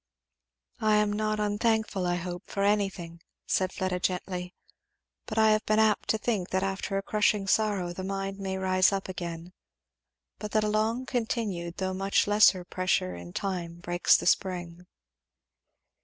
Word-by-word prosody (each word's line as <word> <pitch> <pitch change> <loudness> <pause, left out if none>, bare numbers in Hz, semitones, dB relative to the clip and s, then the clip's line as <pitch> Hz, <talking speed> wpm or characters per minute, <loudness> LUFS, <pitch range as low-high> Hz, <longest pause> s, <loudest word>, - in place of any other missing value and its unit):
"I 215 -1 +3
am 210 0 +2
not 215 0 -1
unthankful, 210 -2 0
I 175 - +1
hope, 175 0 -5
for 200 - -2
anything," 195 -5 -1 0.2
said 185 -1 0
Fleda 185 -2 -2
gently; 180 0 -3 0.7
"but 220 - -5
I 220 0 +5
have 215 0 +2
been 215 - +3
apt 220 -1 +2
to 220 - +3
think 215 -5 -2
that 190 0 0
after 195 0 -2
a 195 - -2
crushing 210 -1 +1
sorrow 195 -4 +1
the 185 - -6
mind 195 0 -4
may 190 -1 -3
rise 185 0 +3
up 195 -1 -2
again, 175 -1 -6 0.9
but 210 - -6
that 215 -1 +3
a - - +1
long 220 +4 0
continued 220 -9 -2
though 190 0 -2
much 195 +1 +1
lesser 205 -3 +5
pressure 185 - 0
in 85 0 -9
time 175 - -3
breaks 175 0 +3
the - - -5
spring." 180 -2 -1
195 Hz, 160 wpm, -28 LUFS, 180-210 Hz, 0.9 s, I